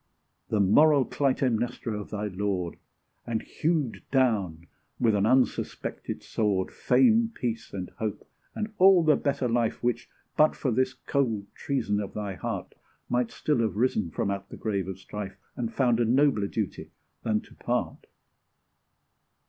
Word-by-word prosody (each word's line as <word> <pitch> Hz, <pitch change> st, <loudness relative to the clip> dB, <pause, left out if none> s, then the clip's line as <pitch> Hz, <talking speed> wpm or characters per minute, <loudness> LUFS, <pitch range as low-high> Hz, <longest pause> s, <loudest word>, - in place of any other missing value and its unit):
The 110 Hz, -, +1 dB
moral 140 Hz, +8 st, +5 dB
Clytemnestra 125 Hz, -4 st, 0 dB
of 105 Hz, -1 st, -6 dB
thy 105 Hz, 0 st, -3 dB
lord, 95 Hz, -3 st, -2 dB, 0.5 s
And 115 Hz, -2 st, -1 dB
hewed 155 Hz, -7 st, -1 dB
down, 105 Hz, -, +1 dB, 0.3 s
with 115 Hz, -2 st, +3 dB
an 100 Hz, +1 st, +2 dB
unsuspected 130 Hz, +1 st, 0 dB
sword, 100 Hz, -4 st, 0 dB
Fame, 230 Hz, -2 st, +4 dB
peace, 115 Hz, -2 st, -3 dB
and 95 Hz, -2 st, -5 dB
hope 110 Hz, -3 st, -3 dB, 0.3 s
and 215 Hz, 0 st, -3 dB
all 185 Hz, -2 st, +7 dB
the 155 Hz, -2 st, +5 dB
better 140 Hz, -3 st, 0 dB
life 115 Hz, -1 st, 0 dB
Which, 120 Hz, 0 st, -1 dB, 0.3 s
but 155 Hz, 0 st, +4 dB
for 130 Hz, -, -1 dB
this 130 Hz, +3 st, +1 dB
cold 120 Hz, -5 st, -1 dB
treason 115 Hz, -7 st, -1 dB
of 100 Hz, -2 st, -5 dB
thy 105 Hz, -2 st, -3 dB
heart, 90 Hz, -, -5 dB, 0.4 s
Might 125 Hz, -1 st, +1 dB
still 150 Hz, -5 st, 0 dB
have 110 Hz, -3 st, 0 dB
risen 110 Hz, -5 st, +1 dB
from 100 Hz, +5 st, -1 dB
out 100 Hz, 0 st, -5 dB
the -, -, -9 dB
grave 100 Hz, -4 st, -2 dB
of 95 Hz, -1 st, -5 dB
strife, 100 Hz, +1 st, -7 dB, 0.2 s
And 120 Hz, -3 st, -3 dB
found 120 Hz, -2 st, +2 dB
a 120 Hz, -, +3 dB
nobler 125 Hz, -4 st, +3 dB
duty 105 Hz, -1 st, -4 dB, 0.3 s
than 110 Hz, -1 st, +1 dB
to -, -, -18 dB
part. -, -, -3 dB
115 Hz, 150 wpm, -27 LUFS, 105-130 Hz, 0.5 s, all